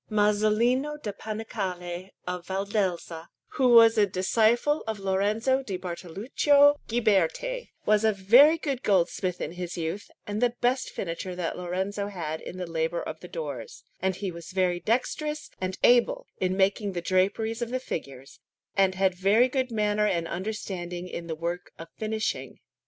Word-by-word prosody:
Masolino 215 Hz, +7 st, +2 dB
da 210 Hz, -, -2 dB
Panicale 190 Hz, -4 st, -5 dB, 0.2 s
of 180 Hz, -1 st, -5 dB
Valdelsa, 190 Hz, -4 st, -2 dB, 0.2 s
who 260 Hz, -, +1 dB
was 230 Hz, -1 st, +7 dB
a 205 Hz, -, +5 dB
disciple 225 Hz, +10 st, +2 dB
of 220 Hz, -1 st, -2 dB
Lorenzo 210 Hz, +7 st, +1 dB
di 200 Hz, -8 st, -4 dB
Bartoluccio 215 Hz, -, +3 dB
Ghiberti, 235 Hz, -, +1 dB, 0.2 s
was 215 Hz, 0 st, +3 dB
a 220 Hz, -, +4 dB
very 240 Hz, +11 st, +6 dB
good 275 Hz, -6 st, -3 dB
goldsmith 185 Hz, -2 st, +1 dB
in 150 Hz, -, -3 dB
his 180 Hz, 0 st, -6 dB
youth, 165 Hz, +5 st, -4 dB, 0.2 s
and 210 Hz, +2 st, -3 dB
the 245 Hz, -1 st, +2 dB
best 250 Hz, +2 st, +1 dB
finisher 180 Hz, +1 st, -5 dB
that 175 Hz, -2 st, -3 dB
Lorenzo 190 Hz, +3 st, -3 dB
had 160 Hz, -6 st, -5 dB
in 185 Hz, -, -8 dB
the 180 Hz, -, -3 dB
labour 165 Hz, 0 st, -2 dB
of 155 Hz, -, -6 dB
the 180 Hz, -, -10 dB
doors; 145 Hz, -9 st, -6 dB, 0.2 s
and 190 Hz, 0 st, 0 dB
he 190 Hz, 0 st, -4 dB
was 170 Hz, -1 st, -10 dB
very 180 Hz, -2 st, +1 dB
dexterous 300 Hz, -, -1 dB
and 185 Hz, 0 st, -2 dB
able -, -, +4 dB
in 185 Hz, 0 st, 0 dB
making 195 Hz, +1 st, +1 dB
the 175 Hz, -, -3 dB
draperies 200 Hz, +6 st, 0 dB
of 235 Hz, -, -2 dB
the 255 Hz, +1 st, -1 dB
figures, 135 Hz, -, -7 dB, 0.4 s
and 190 Hz, -1 st, +3 dB
had 190 Hz, -1 st, +2 dB
very 200 Hz, +7 st, +4 dB
good 260 Hz, 0 st, -1 dB
manner 210 Hz, -2 st, +1 dB
and 170 Hz, -4 st, 0 dB
understanding 180 Hz, -2 st, -4 dB
in 170 Hz, -1 st, -6 dB
the 160 Hz, -, -3 dB
work 170 Hz, +2 st, -4 dB
of 165 Hz, 0 st, -10 dB
finishing. 220 Hz, 0 st, -3 dB
195 Hz, 160 wpm, -27 LUFS, 180-225 Hz, 0.4 s, was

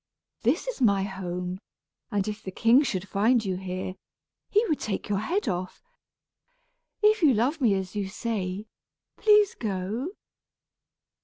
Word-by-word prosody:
This -, -, +1 dB
is -, -, -4 dB
my 200 Hz, -5 st, +4 dB
home, 180 Hz, -1 st, -4 dB, 0.5 s
and 205 Hz, -3 st, -1 dB
if 210 Hz, 0 st, -4 dB
the -, -, -6 dB
king 230 Hz, +7 st, +5 dB
should 195 Hz, -9 st, -2 dB
find 220 Hz, +4 st, +2 dB
you 190 Hz, -1 st, -1 dB
here, 185 Hz, 0 st, -4 dB, 0.6 s
he 425 Hz, +3 st, +3 dB
would 310 Hz, -8 st, 0 dB
take 205 Hz, -1 st, -3 dB
your 200 Hz, -1 st, +1 dB
head 345 Hz, -, -1 dB
off. 185 Hz, -2 st, -3 dB, 1.2 s
If 425 Hz, 0 st, +5 dB
you 290 Hz, -7 st, +5 dB
love 270 Hz, +8 st, +1 dB
me 220 Hz, -6 st, +4 dB
as 190 Hz, 0 st, -4 dB
you 200 Hz, -2 st, -2 dB
say, 200 Hz, -2 st, -3 dB, 0.5 s
please 420 Hz, -2 st, +5 dB
go." 210 Hz, -, -3 dB
210 Hz, 145 wpm, -27 LUFS, 190-255 Hz, 1.2 s, king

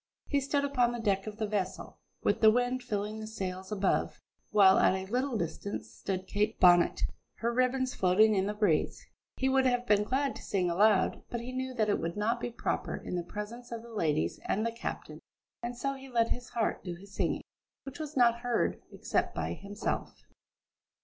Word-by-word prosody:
He 285 Hz, -1 st, +1 dB
stood 280 Hz, +1 st, 0 dB
upon 250 Hz, -4 st, +2 dB
the 240 Hz, -, -4 dB
deck 200 Hz, -2 st, 0 dB
of 210 Hz, 0 st, -6 dB
the 220 Hz, -, -1 dB
vessel, 205 Hz, -3 st, -3 dB, 0.2 s
with -, -, +1 dB
the 220 Hz, -, +8 dB
wind 245 Hz, +3 st, +1 dB
filling 215 Hz, -2 st, -3 dB
the 215 Hz, -, -6 dB
sails 190 Hz, -3 st, -5 dB
above, 200 Hz, -2 st, 0 dB, 0.3 s
while 195 Hz, -2 st, +6 dB
at -, -, +4 dB
a 190 Hz, 0 st, -3 dB
little 255 Hz, 0 st, 0 dB
distance 200 Hz, +3 st, -4 dB
stood 190 Hz, -1 st, -4 dB
Kate 210 Hz, +3 st, -1 dB
Bonnet, 175 Hz, -1 st, +5 dB, 0.3 s
her 235 Hz, +1 st, -1 dB
ribbons 255 Hz, +1 st, +1 dB
floating 210 Hz, +1 st, +4 dB
in 195 Hz, -1 st, +1 dB
the 210 Hz, -, -2 dB
breeze. 210 Hz, 0 st, +1 dB, 0.3 s
He 265 Hz, -, +1 dB
would 265 Hz, 0 st, +4 dB
have 245 Hz, -1 st, +1 dB
been 210 Hz, -3 st, +4 dB
glad 270 Hz, +5 st, 0 dB
to -, -, -11 dB
sing 180 Hz, -3 st, 0 dB
aloud, 200 Hz, +2 st, +3 dB
but 240 Hz, -, -3 dB
he 240 Hz, +2 st, -6 dB
knew 260 Hz, 0 st, -3 dB
that 220 Hz, -3 st, +2 dB
that 210 Hz, -, +1 dB
would 170 Hz, +3 st, -3 dB
not 230 Hz, +3 st, +1 dB
be 240 Hz, -, -3 dB
proper 235 Hz, -, -2 dB
in -, -, -5 dB
the 175 Hz, -, 0 dB
presence 210 Hz, +7 st, -7 dB
of 230 Hz, -1 st, -5 dB
the 235 Hz, -1 st, -12 dB
ladies 150 Hz, -, 0 dB
and 215 Hz, +3 st, 0 dB
the 230 Hz, -, 0 dB
captain. 230 Hz, -, -6 dB, 0.4 s
And 240 Hz, 0 st, -4 dB
so 275 Hz, +2 st, -1 dB
he 270 Hz, 0 st, -10 dB
let 230 Hz, -2 st, +2 dB
his 245 Hz, 0 st, -3 dB
heart 230 Hz, -2 st, -1 dB
do 175 Hz, -2 st, -5 dB
his 195 Hz, +3 st, -14 dB
singing, -, -, -1 dB, 0.4 s
which 275 Hz, +1 st, -9 dB
was 305 Hz, -2 st, -5 dB
not 235 Hz, -1 st, +5 dB
heard, 245 Hz, 0 st, 0 dB
except -, -, -1 dB
by -, -, -2 dB
himself. 205 Hz, +2 st, -4 dB
220 Hz, 205 wpm, -31 LUFS, 200-245 Hz, 0.4 s, the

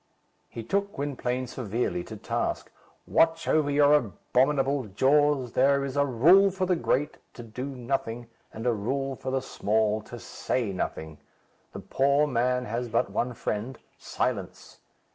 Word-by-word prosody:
He 115 Hz, -, -7 dB
took 200 Hz, -, -1 dB
Gwynplaine 130 Hz, -3 st, -2 dB
severely 115 Hz, -7 st, -3 dB
to -, -, -8 dB
task. -, -, -3 dB, 0.3 s
"Watch 165 Hz, 0 st, +2 dB
over 155 Hz, -2 st, +2 dB
your 145 Hz, 0 st, +4 dB
abominable 135 Hz, +2 st, +1 dB
jaws. 135 Hz, +4 st, +2 dB
There 140 Hz, +1 st, +3 dB
is 135 Hz, 0 st, -5 dB
a 140 Hz, 0 st, +2 dB
rule 170 Hz, -, +5 dB
for 185 Hz, 0 st, -2 dB
the 180 Hz, 0 st, +2 dB
great 150 Hz, -3 st, -1 dB, 0.2 s
to 120 Hz, -, -8 dB
do 115 Hz, +3 st, -6 dB
nothing; 120 Hz, -3 st, -3 dB, 0.3 s
and 110 Hz, +2 st, -7 dB
a 120 Hz, -, +3 dB
rule 135 Hz, +6 st, -2 dB
for 130 Hz, -, -6 dB
the 130 Hz, 0 st, -1 dB
small 110 Hz, -2 st, 0 dB
to 120 Hz, +3 st, -10 dB
say 115 Hz, -2 st, -3 dB
nothing. 80 Hz, -4 st, -5 dB, 0.5 s
The -, -, -7 dB
poor 140 Hz, +2 st, +2 dB
man 125 Hz, -1 st, 0 dB
has 120 Hz, +2 st, -3 dB
but 115 Hz, +1 st, 0 dB
one 125 Hz, 0 st, -2 dB
friend, 110 Hz, +5 st, -4 dB, 0.2 s
silence. -, -, -4 dB
130 Hz, 150 wpm, -27 LUFS, 115-145 Hz, 0.5 s, rule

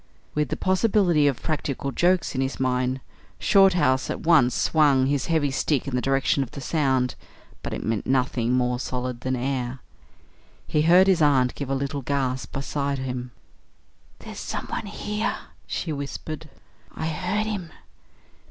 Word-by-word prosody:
With 150 Hz, -3 st, 0 dB
the -, -, -2 dB
possibility 185 Hz, -5 st, +3 dB
of 135 Hz, -4 st, -1 dB
practical 140 Hz, -3 st, -2 dB
jokes 180 Hz, +4 st, +2 dB
in 130 Hz, -, -1 dB
his 135 Hz, +1 st, -2 dB
mind, 130 Hz, 0 st, 0 dB, 0.4 s
Shorthouse 180 Hz, -10 st, +4 dB
at -, -, -3 dB
once 150 Hz, -7 st, +4 dB
swung 145 Hz, -4 st, +3 dB
his 140 Hz, -1 st, 0 dB
heavy 155 Hz, -4 st, +1 dB
stick 140 Hz, 0 st, 0 dB
in 135 Hz, -, -2 dB
the 125 Hz, -, +1 dB
direction 135 Hz, +1 st, +1 dB
of 135 Hz, -, -3 dB
the -, -, -9 dB
sound; 130 Hz, -3 st, +1 dB, 0.5 s
but -, -, -5 dB
it -, -, -4 dB
met 110 Hz, -2 st, -2 dB
nothing 125 Hz, -2 st, +1 dB
more 125 Hz, -1 st, +1 dB
solid 125 Hz, -1 st, -4 dB
than 130 Hz, 0 st, -1 dB
air. 125 Hz, 0 st, -2 dB, 0.9 s
He 150 Hz, -, +1 dB
heard 175 Hz, +4 st, +6 dB
his 190 Hz, -4 st, +3 dB
aunt 135 Hz, -4 st, +4 dB
give 140 Hz, -2 st, -6 dB
a 135 Hz, -, +1 dB
little 140 Hz, +1 st, -2 dB
gasp 130 Hz, -1 st, -2 dB
beside 140 Hz, 0 st, -2 dB
him. 125 Hz, -1 st, -4 dB, 0.9 s
"There's -, -, -9 dB
someone -, -, -4 dB
here," 210 Hz, +1 st, -2 dB, 0.3 s
she 160 Hz, -, -3 dB
whispered; 150 Hz, +2 st, -6 dB, 0.5 s
"I 160 Hz, -, -3 dB
heard 180 Hz, +6 st, -1 dB
him." 200 Hz, -6 st, -4 dB
140 Hz, 155 wpm, -25 LUFS, 130-160 Hz, 0.9 s, heard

